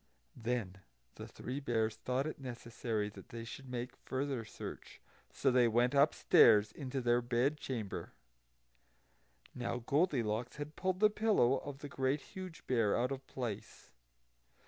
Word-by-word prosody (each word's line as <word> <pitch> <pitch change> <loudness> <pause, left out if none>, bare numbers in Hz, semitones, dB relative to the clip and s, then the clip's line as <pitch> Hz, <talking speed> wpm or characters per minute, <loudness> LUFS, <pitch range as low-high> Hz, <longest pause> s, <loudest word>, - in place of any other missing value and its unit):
Then 110 -5 -2 0.3
the - - -8
Three 130 +3 -5
Bears 115 -5 0
thought 130 +2 -1
it 155 - -4
necessary 115 -4 -3
that 100 -2 -13
they 115 0 -6
should 130 +3 -8
make 125 0 -4
further 130 -2 -3
search; 110 - -8 0.3
so 135 - +2
they 125 -1 +5
went 120 +3 +3
upstairs 115 -7 +6
into 135 +2 -4
their 120 0 +3
bed 125 +4 +1
chamber. 115 -9 -4 1.4
Now 120 -1 -2
Goldilocks 125 - +1
had 150 +1 -6
pulled 185 +1 -1
the 215 0 +6
pillow 210 - +3
of 140 -1 -8
the 145 - -5
Great 135 +1 0
Huge 185 0 -9
Bear 115 -5 +2
out 125 +3 +1
of 135 - -2
its 135 - -27
place. 120 -6 -5
125 Hz, 145 wpm, -35 LUFS, 115-140 Hz, 1.4 s, upstairs